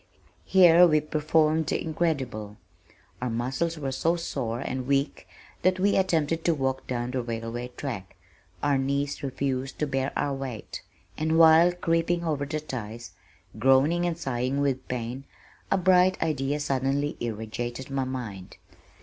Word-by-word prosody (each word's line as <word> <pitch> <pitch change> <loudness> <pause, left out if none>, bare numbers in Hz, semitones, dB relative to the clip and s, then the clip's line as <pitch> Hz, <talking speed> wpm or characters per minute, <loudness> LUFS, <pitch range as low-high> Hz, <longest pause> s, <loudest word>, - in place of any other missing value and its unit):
Here 180 -2 +7
we 155 -2 +4
performed 155 +1 +1
the - - 0
incredible. 135 -11 -2 0.6
Our 125 - -1
muscles 135 +8 -2
were 140 -3 -3
so 165 +6 +1
sore 120 -9 -3
and 130 -1 -4
weak 140 +1 0 0.3
that 185 0 +3
as - - -9
we 200 +2 +3
attempted 165 -4 +1
to 170 - +2
walk 130 -2 -2
down 120 -1 -2
the 130 0 -1
railway 115 +1 -4
track, 110 -10 -5 0.5
our 145 -2 +2
knees 140 +2 -1
refused 135 -1 -3
to 150 - 0
bear 135 -1 -1
our 140 - 0
weight, 135 -5 -6 0.4
and 160 +1 +1
while 165 +1 +7
creeping 170 0 0
over 145 -4 -1
the 155 +1 -2
ties, 120 -5 -7 0.5
groaning 135 +8 +4
and 170 -2 -2
sighing 135 -3 -2
with 135 -2 -1
pain, 125 +2 -4 0.4
a 195 - +3
bright 185 0 +4
idea 145 -2 -1
suddenly 140 +1 0
irradiated 120 +3 -5
my 135 -1 0
mind. 115 -8 -6
140 Hz, 150 wpm, -27 LUFS, 125-160 Hz, 0.6 s, Here